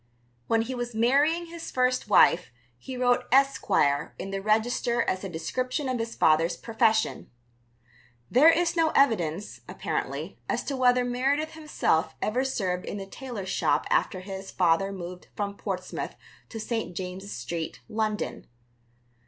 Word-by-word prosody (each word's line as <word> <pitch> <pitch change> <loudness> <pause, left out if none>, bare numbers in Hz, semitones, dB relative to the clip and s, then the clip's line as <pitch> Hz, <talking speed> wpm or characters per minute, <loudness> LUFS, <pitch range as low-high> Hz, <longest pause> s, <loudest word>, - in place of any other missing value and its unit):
When 225 0 +2
he 255 +3 -5
was 240 -2 -4
marrying 285 +9 +3
his 335 0 -8
first 255 -2 +1
wife 180 -3 +5 0.3
he 260 - -7
wrote 245 0 +2
"Esquire" 245 - +2
in 195 - -6
the 195 0 -3
register 225 +3 +1
as 185 +1 -2
a 195 - -4
description 255 - -2
of 255 -2 -1
his 230 0 -4
father's 160 +2 +3
profession. 225 -1 +1 1.0
There 290 +6 +7
is 335 0 +2
no 325 -2 +3
evidence, 205 - +1
apparently, - - -4
as - - 0
to 280 - -3
whether 250 -1 +3
Meredith 275 +6 0
himself 290 - 0
ever 245 +5 0
served 185 -9 -2
in - - -4
the 195 - -5
tailor's 210 -2 -7
shop - - +1
after 185 - +1
his 195 0 -7
father 175 +4 +2
moved 180 -1 -8
from 200 -1 -3
Portsmouth 185 -3 -4 0.3
to 225 - -6
St. 220 -5 -3
James's 190 +2 -5
Street, 160 +6 -5
London. 215 -1 -2
225 Hz, 145 wpm, -27 LUFS, 185-255 Hz, 1.0 s, There